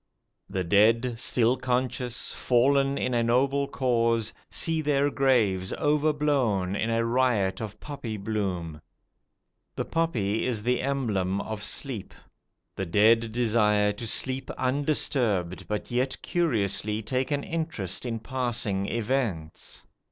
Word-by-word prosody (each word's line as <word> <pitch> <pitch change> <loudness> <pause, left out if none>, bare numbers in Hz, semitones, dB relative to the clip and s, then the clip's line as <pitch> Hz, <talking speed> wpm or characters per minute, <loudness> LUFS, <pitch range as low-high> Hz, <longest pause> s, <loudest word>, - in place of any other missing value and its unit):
The 95 - -2
dead, 115 +6 +3
still 120 -1 +3
conscious, 125 -1 -2
fallen 135 +3 +2
in 125 - -1
a 120 - +2
noble 135 +4 +2
cause, 115 -4 +1 0.2
see 165 -1 -1
their 145 -1 +2
graves 110 -10 +2
overblown 145 - +1
in 110 +3 -1
a 115 0 +1
riot 115 -6 +1
of 105 -1 -6
poppy 125 -7 -6
bloom. 95 -7 -3 0.9
The - - -2
poppy 115 -11 0
is 115 -5 -1
the 125 +1 +1
emblem 105 -9 -1
of 110 0 -5
sleep. 110 +1 -3 0.6
The 95 - -3
dead 110 +5 +4
desire 105 -3 +2
to 115 +3 -6
sleep 130 +4 -1
undisturbed, 125 - 0
but 105 +2 -4
yet 125 +2 0
curiously 110 - 0
take 130 +4 -1
an 145 -1 -1
interest 160 - -2
in 120 -2 -2
passing 120 -6 -1
events. 110 -9 -3
115 Hz, 120 wpm, -27 LUFS, 105-130 Hz, 0.9 s, dead